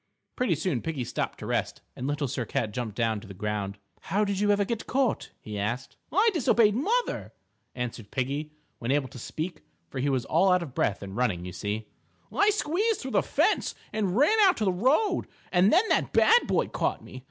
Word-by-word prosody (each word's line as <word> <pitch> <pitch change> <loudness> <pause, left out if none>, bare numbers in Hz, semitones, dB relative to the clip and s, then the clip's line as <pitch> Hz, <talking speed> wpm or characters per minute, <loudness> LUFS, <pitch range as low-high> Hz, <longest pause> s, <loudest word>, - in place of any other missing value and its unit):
Pretty 250 -9 +1
soon 155 -5 -1
Piggie 155 -6 -3
stopped - - -3
to - - -8
rest, - - -2
and 130 - -4
Little 145 0 -1
Sir 125 0 -2
Cat 115 -2 -2
jumped 110 -2 -4
down 115 -2 0
to 105 - -13
the 100 - -10
ground. 105 0 -3 0.2
"How 210 +2 0
did 200 -1 -1
you 205 0 +2
ever 205 0 +3
get 225 +1 -3
caught?" 265 -2 0
he 105 -1 -5
asked. 120 +6 -3 0.2
"I 415 - +4
disobeyed 235 - +4
mother," 430 - -1 0.4
answered 120 -4 -5
Piggie 140 +4 -2 0.3
when 115 - -4
able 135 -1 +1
to 135 - -10
speak, 160 +8 -5 0.3
for 135 - -4
he 140 +3 +1
was 130 -3 0
all 185 +4 +3
out 180 -1 +3
of 140 -7 -9
breath 100 -5 0
with 100 -1 -7
running, 100 -5 -1
you 90 - -6
see. 105 +3 -3 0.5
"I 405 +1 +5
squeezed 420 +2 +1
through 265 - -5
the - - +3
fence - - +1 0.2
and 205 -2 0
ran 365 - +4
out 390 -3 +6
to 215 - 0
the 190 - +2
road, 265 - +2 0.2
and 185 +2 +4
then 380 +7 +4
that - - +1
bad 475 +2 +5
boy - - +1
caught - - -1
me. 130 - -10
155 Hz, 210 wpm, -27 LUFS, -, 0.5 s, out